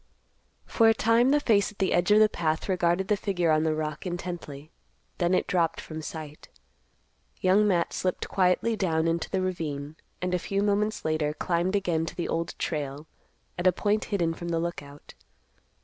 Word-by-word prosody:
For 225 Hz, -1 st, +4 dB
a 225 Hz, -, +4 dB
time 230 Hz, +3 st, +3 dB
the 295 Hz, +2 st, +4 dB
face 215 Hz, -8 st, +2 dB
at 210 Hz, -, -20 dB
the 190 Hz, -, +1 dB
edge 175 Hz, +2 st, +2 dB
of 210 Hz, +1 st, +6 dB
the 215 Hz, -, +7 dB
path 160 Hz, -6 st, -2 dB
regarded 180 Hz, 0 st, +1 dB
the 210 Hz, -, +3 dB
figure 180 Hz, -5 st, 0 dB
on 155 Hz, 0 st, +3 dB
the 155 Hz, -1 st, +1 dB
rock 155 Hz, -1 st, -4 dB
intently; 175 Hz, -5 st, -6 dB, 0.5 s
then 175 Hz, +1 st, +2 dB
it -, -, +1 dB
dropped 170 Hz, -3 st, 0 dB
from 155 Hz, 0 st, -7 dB
sight. 155 Hz, -1 st, -8 dB, 0.9 s
Young 195 Hz, +3 st, +4 dB
Matt 175 Hz, -4 st, +1 dB
slipped 185 Hz, -1 st, -2 dB
quietly 190 Hz, +5 st, +2 dB
down 165 Hz, -5 st, 0 dB
into 165 Hz, 0 st, -1 dB
the 190 Hz, -1 st, -1 dB
ravine, 155 Hz, -5 st, -4 dB, 0.2 s
and 180 Hz, 0 st, -2 dB
a 180 Hz, -, +1 dB
few 200 Hz, +3 st, -1 dB
moments 210 Hz, +1 st, 0 dB
later 155 Hz, -1 st, 0 dB
climbed 180 Hz, +3 st, 0 dB
again 170 Hz, -5 st, 0 dB
to -, -, -6 dB
the 175 Hz, -, -3 dB
Old 165 Hz, 0 st, -3 dB
Trail 145 Hz, -2 st, -3 dB, 0.5 s
at 175 Hz, -, +2 dB
a -, -, +7 dB
point 210 Hz, +4 st, 0 dB
hidden 170 Hz, -5 st, 0 dB
from 170 Hz, +1 st, -7 dB
the 165 Hz, -1 st, 0 dB
Lookout. 145 Hz, -4 st, -6 dB
175 Hz, 185 wpm, -27 LUFS, 160-200 Hz, 0.9 s, the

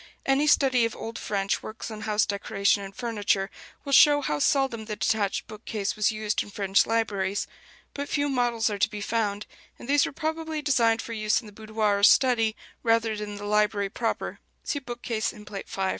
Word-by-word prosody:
Any 275 Hz, +2 st, +2 dB
study 265 Hz, -4 st, +4 dB
of 230 Hz, -1 st, -1 dB
old 225 Hz, +1 st, -6 dB
French 195 Hz, -1 st, -1 dB
works 225 Hz, +1 st, -7 dB
on 215 Hz, -1 st, -7 dB
house 215 Hz, -1 st, +1 dB
decoration 200 Hz, 0 st, 0 dB
and 195 Hz, 0 st, -8 dB
furniture 205 Hz, -4 st, -1 dB, 0.3 s
will 280 Hz, -, -2 dB
show 290 Hz, +1 st, +7 dB
how 150 Hz, -, -1 dB
seldom 250 Hz, -, +1 dB
the 215 Hz, -1 st, -4 dB
detached 205 Hz, -2 st, 0 dB
bookcase 215 Hz, -1 st, -4 dB
was 215 Hz, 0 st, +2 dB
used 215 Hz, -1 st, -1 dB
in -, -, -7 dB
French 195 Hz, -1 st, +2 dB
libraries: 205 Hz, -4 st, 0 dB, 0.5 s
but 285 Hz, 0 st, -5 dB
few 290 Hz, 0 st, +1 dB
models 240 Hz, -4 st, +1 dB
are 205 Hz, -, -4 dB
to -, -, +3 dB
be 210 Hz, -, -6 dB
found, 205 Hz, -1 st, -1 dB, 0.3 s
and -, -, -11 dB
these 285 Hz, +1 st, +3 dB
were -, -, -6 dB
probably 315 Hz, +1 st, -3 dB
designed 230 Hz, -5 st, +2 dB
for 230 Hz, -, -6 dB
use 215 Hz, -1 st, +1 dB
in 235 Hz, -, -12 dB
the 210 Hz, -, -12 dB
boudoir 215 Hz, -1 st, 0 dB
or -, -, -5 dB
study, 225 Hz, -1 st, +5 dB, 0.3 s
rather 225 Hz, -1 st, +2 dB
than 210 Hz, 0 st, -5 dB
in -, -, -7 dB
the 205 Hz, -, -7 dB
library 210 Hz, -1 st, +1 dB
proper 230 Hz, -2 st, -3 dB, 0.2 s
(see 285 Hz, -, -2 dB
bookcase 240 Hz, -3 st, -3 dB
in 210 Hz, -2 st, -13 dB
Plate 205 Hz, -2 st, -7 dB
V). -, -, -7 dB
220 Hz, 200 wpm, -26 LUFS, 205-240 Hz, 0.5 s, show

